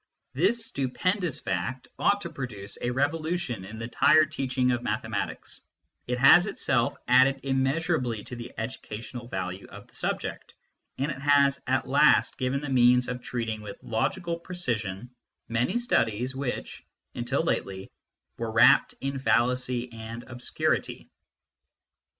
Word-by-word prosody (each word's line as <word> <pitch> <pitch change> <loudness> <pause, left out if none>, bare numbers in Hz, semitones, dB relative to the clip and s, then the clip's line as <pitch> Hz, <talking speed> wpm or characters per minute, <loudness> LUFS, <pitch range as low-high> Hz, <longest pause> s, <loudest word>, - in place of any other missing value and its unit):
This 210 - +1
stupendous 175 - -1
fact 95 +8 -3
ought 205 0 +3
to 170 - -6
produce 105 -7 -6
a 120 - 0
revolution 145 - -1
in 105 +4 -9
the 115 +1 -7
higher 155 -2 +6
teaching 130 -4 0
of 120 -1 -1
mathematics; - - -4 0.5
it 125 0 -1
has 140 +9 +7
itself 130 -11 +1
added 130 +2 +5
immeasurably 135 -3 0
to 125 - -8
the 120 0 -8
educational 115 0 -6
value 95 -2 -5
of - - -12
the - - -26
subject, - - -4 0.4
and 140 +3 -1
it 135 - -6
has 140 -1 +4
at - - +1
last - - +4
given 130 +2 0
the 145 - -5
means 125 -1 +4
of 125 0 -4
treating 115 -3 -3
with 105 -1 -8
logical 170 +9 -1
precision 120 - -4 0.4
many 115 - +1
studies 125 - 0
which, 135 -2 -4 0.3
until 125 +6 -1
lately, 95 - -2 0.5
were 115 -1 -2
wrapped 115 +2 +5
in 135 0 -2
fallacy 125 -1 +1
and 115 +1 -7
obscurity. 125 -1 -2
125 Hz, 135 wpm, -27 LUFS, 115-140 Hz, 0.5 s, has